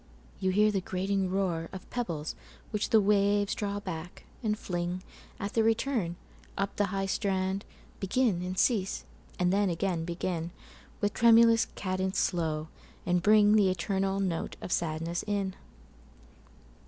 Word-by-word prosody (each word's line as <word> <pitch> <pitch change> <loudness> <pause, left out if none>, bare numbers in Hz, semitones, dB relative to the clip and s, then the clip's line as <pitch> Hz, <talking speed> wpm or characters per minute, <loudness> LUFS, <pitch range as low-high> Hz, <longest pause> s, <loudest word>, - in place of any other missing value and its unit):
you 190 - +1
hear 210 +3 +4
the 195 -2 0
grating 190 +1 -1
roarOf 185 -1 -2
pebbles 170 -11 -3 0.4
which 210 -2 -1
the 220 - +6
waves 205 0 +3
draw 205 -1 -2
back, 180 -3 -7 0.2
and 215 -3 0
fling, 175 -1 -3 0.4
At 200 +1 -4
their 225 - +3
return, 225 -5 +1 0.4
up 200 0 -1
the 205 - +1
high 195 +1 -1
strand, 190 -1 -1 0.3
Begin, 200 -1 +1
and 185 +1 -4
cease, 200 -5 +1 0.3
and 180 0 +2
then 200 -1 +3
again 170 0 -1
begin, 170 0 -3 0.5
With 205 0 +1
tremulous 230 0 +6
cadence 185 0 -2
slow, 160 -3 0 0.4
and 180 0 +2
bringThe 210 -1 +6
eternal 195 +1 0
note 185 -4 -2
of - - -7
sadness 165 +1 -1
in. 200 -2 -1
195 Hz, 135 wpm, -30 LUFS, 180-205 Hz, 0.5 s, the